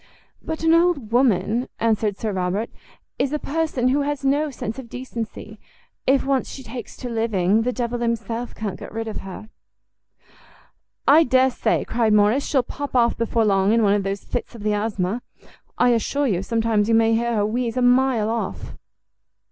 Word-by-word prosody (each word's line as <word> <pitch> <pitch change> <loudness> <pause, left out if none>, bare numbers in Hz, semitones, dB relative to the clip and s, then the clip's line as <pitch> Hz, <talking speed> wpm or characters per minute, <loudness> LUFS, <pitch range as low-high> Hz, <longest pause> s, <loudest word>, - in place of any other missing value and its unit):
"But 320 0 -5
an 325 0 +4
old 335 -9 +2
woman," 235 -1 +2
answered 215 -3 +1
Sir 220 - -2
Robert, 190 +4 -2 0.5
"is 275 - +1
a 300 - 0
person 295 -5 -1
who 280 +3 +2
has 285 -1 -2
no 290 +3 +2
sense 230 -2 -5
of 245 -3 -9
decency; 240 -3 -7 0.5
if 270 +1 +3
once 270 -1 0
she 265 - -8
takes 240 -1 -8
to 250 - -6
living, 225 -3 +1
the 250 +2 0
devil 240 -1 -3
himself 235 0 -3
can't 205 -4 -5
get - - -9
rid 225 +1 -4
of 220 - -4
her." 195 +3 -9 1.6
"I 310 +4 +7
dare 260 -1 +3
say," - - 0
cried 225 -2 +1
Morrice, 210 +6 +3
"she'll 265 -4 +2
pop 285 +1 -6
off 235 -1 +3
before 230 0 0
long 195 0 +3
in 230 -1 +3
one 200 -1 +4
of 205 - +2
those 195 0 -3
fits 245 0 -5
of 220 - -9
the 210 0 +1
asthma. 205 +1 -1 0.6
I 245 - +4
assure 245 +5 +1
you 190 -8 0
sometimes 225 0 0
you 225 - +4
may 225 0 +4
hear 235 +1 0
her 205 -1 +2
wheeze 235 +2 -2
a 250 - +2
mile 245 -3 +3
off." 230 - -4
230 Hz, 185 wpm, -22 LUFS, 215-260 Hz, 1.6 s, I